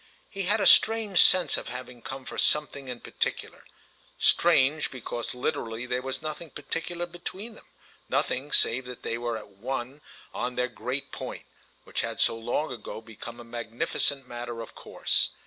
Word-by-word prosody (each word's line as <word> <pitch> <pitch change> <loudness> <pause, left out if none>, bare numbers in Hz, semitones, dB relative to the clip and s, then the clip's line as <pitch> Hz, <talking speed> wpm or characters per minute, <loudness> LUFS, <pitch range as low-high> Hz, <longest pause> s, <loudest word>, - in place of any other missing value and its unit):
He 195 -2 -3
had 210 +4 +3
a - - +2
strange 220 -4 +6
sense 185 -1 +6
of - - -5
having 125 0 -7
come 135 +1 -6
for - - -5
something 145 -2 +2
in 125 -2 -5
particular; - - -2 0.5
strange 155 -3 +4
because 120 -1 -4
literally 125 -3 -2
there 125 0 0
was 130 +3 -4
nothing 155 +1 -4
particular 165 +4 -3
between 185 +6 -7
them, - - -16 0.4
nothing 135 +4 0
save 125 +3 +4
that 125 -1 -8
they 115 - -1
were 120 -1 -1
at 105 - -10
one 125 +7 -4 0.3
on 125 0 -2
their 125 0 +1
great 125 +3 -3
point, - - -6 0.4
which - - -2
had - - +2
long 120 +6 -1
ago 115 -3 -6
become 115 +1 -9
a - - -8
magnificent 120 +3 -1
matter 120 -1 -5
of 115 - -9
course. - - +1
130 Hz, 165 wpm, -28 LUFS, 120-155 Hz, 0.5 s, strange